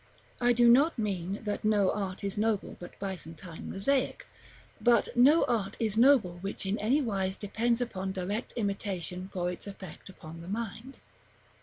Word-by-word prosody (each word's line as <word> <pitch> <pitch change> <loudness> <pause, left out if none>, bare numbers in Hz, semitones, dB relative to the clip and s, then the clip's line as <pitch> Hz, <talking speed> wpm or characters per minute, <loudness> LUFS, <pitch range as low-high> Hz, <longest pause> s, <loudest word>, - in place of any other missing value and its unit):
I 245 0 +4
do 240 0 +5
not 275 +7 +5
mean 195 -3 -2
that 210 -1 -3
no 210 -2 +3
art 195 -1 -4
is 195 -1 -2
noble 215 -1 0
but 175 - -10
Byzantine 170 -3 -7
mosaic; 265 +7 0 0.6
but 240 -2 +4
no 280 +7 +6
art 215 -5 -1
is 220 -3 0
noble 225 -8 +4
which 195 +1 -5
in 195 +3 -1
any 240 +8 +2
wise 190 -5 -1
depends 230 +3 0
upon 195 -6 -3
direct 195 +5 -3
imitation 195 -4 -3
for 180 -1 -1
its 180 - -8
effect 195 -2 -10
upon 165 -3 -11
the 170 - -10
mind. 230 +5 -5
200 Hz, 160 wpm, -30 LUFS, 190-235 Hz, 0.6 s, no